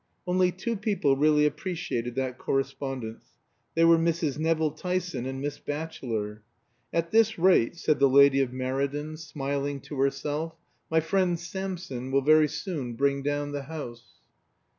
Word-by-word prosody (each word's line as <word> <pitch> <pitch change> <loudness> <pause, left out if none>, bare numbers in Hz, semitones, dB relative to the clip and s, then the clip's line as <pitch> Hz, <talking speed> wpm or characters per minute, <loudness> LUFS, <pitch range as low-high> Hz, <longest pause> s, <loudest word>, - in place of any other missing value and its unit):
Only 180 0 +2
two 225 +6 -3
people 195 -10 +1
really 150 +1 +4
appreciated 150 - -2
that 130 -1 -2
correspondence. 135 -4 -3 0.4
They 165 0 +5
were 165 0 +6
Mrs. 165 -3 0
Nevill 160 -1 +1
Tyson 180 -4 -3
and 135 0 -4
Miss 145 +1 -4
Batchelor. 115 -9 -4 0.5
"At 165 0 -1
this 220 0 +4
rate," 175 -7 +4
said 155 -3 +1
the 140 0 +5
lady 140 0 +6
of 130 -2 0
Meriden, 140 +4 -2
smiling 140 -2 -3
to 145 +1 -7
herself, 150 +4 -1 0.3
"my 160 0 +3
friend 175 +1 +1
Samson 175 -7 -5
will 135 0 +2
very 155 +1 +6
soon 145 -7 -4
bring 140 +2 +1
down 145 +1 -1
the 145 0 -3
house." 130 -6 -8
145 Hz, 145 wpm, -27 LUFS, 135-165 Hz, 0.5 s, were